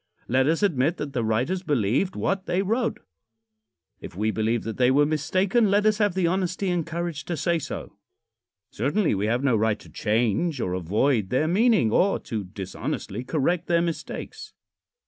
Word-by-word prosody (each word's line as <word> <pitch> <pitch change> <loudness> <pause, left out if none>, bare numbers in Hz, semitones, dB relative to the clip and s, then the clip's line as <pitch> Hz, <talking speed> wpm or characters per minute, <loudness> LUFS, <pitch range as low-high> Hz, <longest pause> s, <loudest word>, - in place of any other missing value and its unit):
Let 130 +2 +2
us 165 +6 +1
admit 160 -3 +2
that 145 -2 -5
the 120 -4 -1
writers 125 +12 0
believed 145 - 0
what 195 0 -1
they 185 +2 +1
wrote. 225 +4 -1 1.0
If - - -10
we 110 +2 +1
believe 110 +1 0
that 115 - -5
they 125 -1 +4
were 145 +3 +4
mistaken, 185 - +1
let 205 +1 +2
us 215 0 +3
have 205 -4 +2
the 190 -2 +1
honesty 185 +1 0
and 175 -2 0
courage 165 -1 -4
to 170 - -3
say 170 +3 +1
so. - - -7 0.7
Certainly 150 - +1
we 100 +1 -1
have 120 +4 0
no 135 -4 +3
right 110 0 +1
to - - -16
change 115 - 0
or 90 - -2
avoid 100 - +1
their 140 +7 +1
meaning, 205 - +3
or 195 - +3
to 110 -4 -5
dishonestly 95 +5 -5
correct 165 +5 0
their 170 -1 +2
mistakes. 170 -2 -5
150 Hz, 175 wpm, -25 LUFS, 115-185 Hz, 1.0 s, they